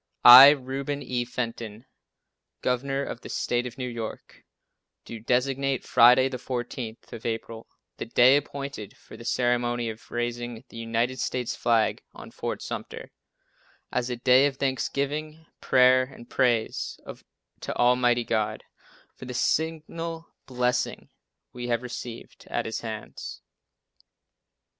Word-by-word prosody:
I, 125 +3 +13
Reuben 140 0 -2
E. 125 -1 -2
Fenton, 115 -2 -5 0.8
Governor 135 +2 -1
of 120 - -6
the - - -10
State 120 0 -1
of 120 - -10
New 125 -1 -3
York, 115 -2 -7 0.6
do 115 - -8
designate 135 +3 0
Friday, 125 +2 +6
the 130 -1 -5
14th 120 -2 -6
of 115 - -8
April, 115 0 -5 0.3
the - - -5
day 125 +3 +6
appointed 140 -6 -4
for - - -14
the - - -11
ceremony 120 -1 0
of 110 +1 -14
raising 120 -1 -4
the - - -12
United 115 +3 -1
States 125 -1 -2
flag 115 -2 +1
on - - -11
Fort - - -5
Sumter, - - -7 0.8
as 125 0 -1
a 125 - -2
day 125 +3 +5
of 135 -2 -5
Thanksgiving, 145 +4 -2
prayer 130 0 +5
and 125 -3 -14
praise 120 -4 0 0.6
to - - -5
Almighty 120 0 +3
God, 110 -2 -1 0.5
for - - -11
the 125 0 -7
signal 165 +3 -2 0.2
blessings 125 -1 -1 0.4
we 120 0 -6
have 120 0 0
received 120 -1 -8
at - - -2
His 110 - -3
hands." 110 -2 -7
125 Hz, 130 wpm, -26 LUFS, 120-135 Hz, 0.8 s, I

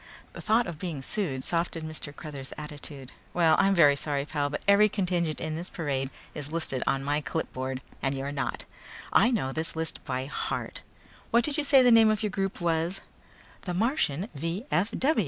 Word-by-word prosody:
The - - -8
thought 225 +3 +3
of 170 -4 -6
being 165 -7 -4
sued 140 -8 -2
softened 165 -2 -1
Mr. 155 -2 -6
Cruthers' 145 -3 -8
attitude. 145 -3 -8 0.2
"Well, 165 -3 +5
I'm 195 0 +4
very 145 -5 +6
sorry, 140 -1 -1
pal, 145 -2 -1
but 145 - -4
every 205 +1 +6
contingent 180 -6 0
in 155 -1 -3
this 170 +3 -4
parade 135 -5 -2 0.2
is 150 -1 -5
listed 160 -6 0
on 135 0 +1
my 145 +2 0
clipboard 130 -4 -3 0.2
and 135 0 0
you're 135 +1 -3
not. 135 -4 -3 0.5
I 235 - +6
know 210 - 0
this 160 +4 -2
list 160 0 -4
by 130 -2 -2
heart. 140 - -3 0.5
What 235 +1 +4
did 295 +2 0
you 300 - +1
say 275 -2 +6
the 245 - +6
name 225 -1 +7
of 215 0 +1
your 210 - 0
group 195 0 -2
was?" 170 +2 0 0.6
"The 180 -2 -4
Martian 205 - +1
V. 165 - -3
160 Hz, 185 wpm, -28 LUFS, 140-195 Hz, 0.6 s, name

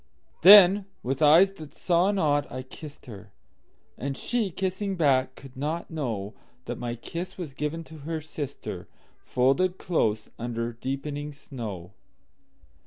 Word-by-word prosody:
Then, 195 +1 +9 0.2
with 135 +4 -2
eyes 165 +6 +7
that 155 -6 -12
saw 175 +2 +2
not, 150 -8 +1
I 130 +1 -5
kissed 145 +3 -11
her; 105 -4 -11 0.7
And 135 0 -3
she, 235 -5 -1
kissing 190 +2 -2
back, 135 -6 +2
could 135 -2 -13
not 155 +6 -3
knowThat 120 -4 -6
my 120 -1 -3
kiss 170 +9 -6
was 165 -7 -6
given 150 +4 -3
to 160 -1 -12
her 160 +3 -4
sister, 145 -2 -6 0.4
Folded 175 +9 +2
close 110 - 0
under 120 0 -3
deepening 145 +4 -4
snow. 110 - -7
145 Hz, 130 wpm, -27 LUFS, 125-170 Hz, 0.7 s, Then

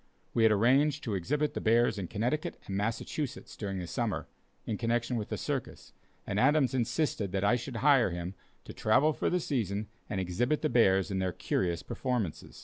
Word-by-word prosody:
We 115 - +2
had 110 -1 +6
arranged 135 +8 +3
to 110 - -2
exhibit 145 - 0
the - - -3
bears 115 -1 +3
in 90 - -4
Connecticut 125 - -2
and 95 - -4
Massachusetts 115 +7 -3
during 100 -3 -4
the 90 - -4
summer, 85 - -2 0.4
in 105 - -3
connection 120 +1 0
with 110 -3 -4
a - - -1
circus, - - -4 0.3
and 100 - -1
Adams 140 +1 +4
insisted 120 - 0
that 95 0 0
I 105 +4 +4
should 125 +1 -5
hire 135 -7 +6
him 85 +1 -4 0.3
to - - -9
travel 130 +8 +3
for 120 - -1
the 180 - +1
season 110 - -2 0.2
and 100 - -2
exhibit 120 - 0
the 155 - +2
bears 95 -6 +3
in 95 - -1
their 95 -1 0
curious 85 0 -1
performances. 125 - -3
115 Hz, 190 wpm, -30 LUFS, 100-130 Hz, 0.4 s, had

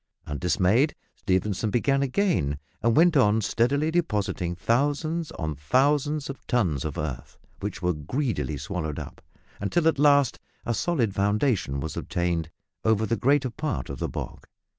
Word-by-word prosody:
Undismayed, 95 - +2 0.2
Stephenson 100 +2 0
began 135 +5 +2
again, 140 - +1 0.2
and 115 0 +2
went 170 +1 +5
on 110 -5 +4
steadily 140 +8 +1
depositing 105 - -1
thousands 145 - 0
on 80 -1 -3
thousands 140 - +1
of 135 - -8
tons 90 - +1
of 75 -2 -4
earth, 65 -6 -5 0.2
which - - -5
were 90 0 +2
greedily 75 - -2
swallowed 80 -3 -4
up, - - -8 0.4
until 155 - +1
at 150 -4 +2
last 145 -3 +4 0.3
a 120 - 0
solid 120 - 0
foundation 100 - +1
was 80 +2 -4
obtained 85 -2 -1 0.3
over 110 -1 +2
the 115 - 0
greater 135 +1 +2
part 130 - -3
of - - -7
the - - -2
bog. - - -7
115 Hz, 145 wpm, -26 LUFS, 90-145 Hz, 0.4 s, went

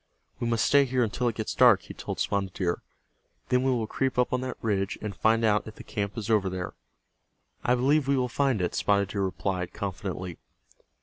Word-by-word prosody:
"We 120 - -1
must 115 -1 +2
stay 140 -1 +5
here 130 -1 +1
until 120 +3 -1
it 115 - 0
gets 110 - -3
dark," - - +6
he - - -9
told - - -6
Spotted 95 -2 -1
Deer. 85 -3 -1 0.7
"Then 125 0 +3
we 135 - +1
will 120 -4 +1
creep 130 +4 -1
up 125 0 +2
on 125 - +1
that 130 0 -4
ridge, 100 -2 -1
and 105 -2 -5
find 115 +1 +3
out 105 0 +2
if 110 - -9
the - - -11
camp 100 +1 -4
is 110 -2 -3
over 105 -4 +2
there." 90 -1 -4 0.9
"I 125 - +3
believe 135 +3 +2
we 140 0 +3
will 125 -1 +1
find 125 -5 +1
it," 90 - -1
Spotted 100 -1 +2
Deer 100 - -2
replied, 90 -1 -2
confidently. 95 -2 -5
110 Hz, 210 wpm, -27 LUFS, 100-125 Hz, 0.9 s, dark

